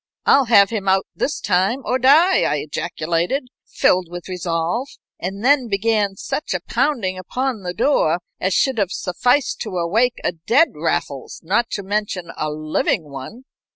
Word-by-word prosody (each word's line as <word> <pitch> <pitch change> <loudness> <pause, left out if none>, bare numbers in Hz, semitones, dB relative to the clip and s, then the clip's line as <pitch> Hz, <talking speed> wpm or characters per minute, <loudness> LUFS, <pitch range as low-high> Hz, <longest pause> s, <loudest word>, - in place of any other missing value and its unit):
"I'll 275 -1 +5
have 205 -3 +5
him 205 -4 -3
out 190 0 +3
this 300 - -2
time 200 +8 +1
or 255 - 0
die!" 315 +9 +5
I - - +1
ejaculated, 170 - -2 0.2
filled 180 -1 +2
with 175 0 -8
resolve, 180 +6 -2 0.3
and 195 +5 -5
then 270 -2 +4
began 205 -1 0
such 195 +2 -3
a - - 0
pounding 230 - -1
upon 250 +4 -3
the 180 -1 -5
door 230 - +2 0.2
as 185 +1 0
should 265 -4 +2
have 195 -2 0
sufficed 245 +11 0
to 200 -5 -4
awake 220 +9 +1
a - - +1
dead 230 - +2
Raffles, 150 -3 -3
not 205 +8 +1
to 200 - -3
mention 195 -4 -3
a 155 - -2
living 155 0 -1
one. 140 - -9
195 Hz, 160 wpm, -20 LUFS, 175-245 Hz, 0.3 s, I'll